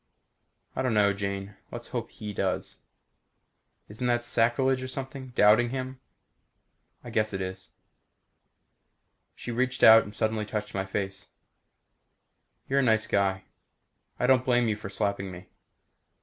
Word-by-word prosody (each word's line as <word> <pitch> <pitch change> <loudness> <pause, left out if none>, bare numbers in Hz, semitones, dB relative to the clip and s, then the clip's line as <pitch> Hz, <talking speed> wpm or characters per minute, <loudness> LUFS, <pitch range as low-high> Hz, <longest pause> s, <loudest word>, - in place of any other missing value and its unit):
"I - - -1
don't 130 -4 0
know, 100 -1 +4
Jane. 100 0 -4
Let's - - -8
hope - - -4
He 105 -1 -7
does." 95 -1 -2 1.1
"Isn't 115 +4 -4
that 120 0 +1
sacrilege 120 +3 +2
or 130 - -4
something? 135 0 -6
Doubting 110 +3 +5
Him?" 130 0 -5 1.0
"I 120 - -8
guess 110 -1 0
it 95 - -2
is." 95 0 -6 1.7
She 120 - -6
reached 130 +2 -1
out 110 -2 +8
suddenly 110 0 0
and 105 - -6
touched 105 -1 -4
my 95 0 -2
face. 95 0 -4 1.4
"You're 135 +1 +2
a - - +4
nice 110 -4 +3
guy. 95 -1 0 0.8
I - - +1
don't 130 -1 +4
blame 120 -2 +2
you 110 - +1
for 105 -2 -8
slapping 100 -1 -2
me." 90 0 -11
110 Hz, 140 wpm, -28 LUFS, 100-125 Hz, 1.7 s, out